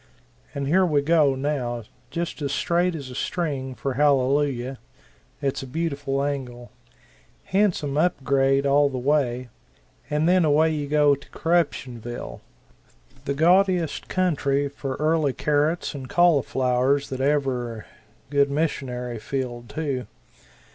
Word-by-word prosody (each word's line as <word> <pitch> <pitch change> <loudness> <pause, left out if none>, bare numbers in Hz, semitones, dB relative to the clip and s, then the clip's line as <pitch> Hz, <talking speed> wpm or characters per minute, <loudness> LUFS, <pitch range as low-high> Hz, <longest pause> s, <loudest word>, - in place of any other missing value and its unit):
And 140 -1 -2
here 185 +6 +4
we 150 -5 +2
go, 150 -3 +3
now, 130 -4 -2 0.3
just 170 +1 -4
as 140 -2 -2
straight 175 +3 +1
as 140 -5 -7
a - - -8
string 135 -4 -3
for 135 +3 -3
Hallelujah 135 -2 +1 0.6
it's 135 -1 -1
a 135 - -7
beautiful 140 -2 -2
angle 125 -5 -4 0.7
handsome 180 -8 +1
up 175 -4 +1
grade 135 +1 +2
all 140 +1 +4
the 130 - -5
way 125 -2 0 0.6
and 150 +2 +1
then 180 0 +4
away 155 +1 +3
you 145 -2 -3
go 145 0 +4
to 140 0 -7
Corruptionville, 125 -8 -2 0.8
the 140 - -1
gaudiest 180 +1 +2
country 145 -6 +1
for 135 -1 -5
early 155 -2 +1
carrots 150 +5 0
and 135 -3 -7
cauliflowers 140 -5 +2
that 130 -1 -4
ever 130 -5 -1 0.5
good 140 -1 +3
missionary 125 -5 -2
field, 120 -1 -4
too. 135 -4 -3
140 Hz, 125 wpm, -24 LUFS, 130-155 Hz, 0.8 s, here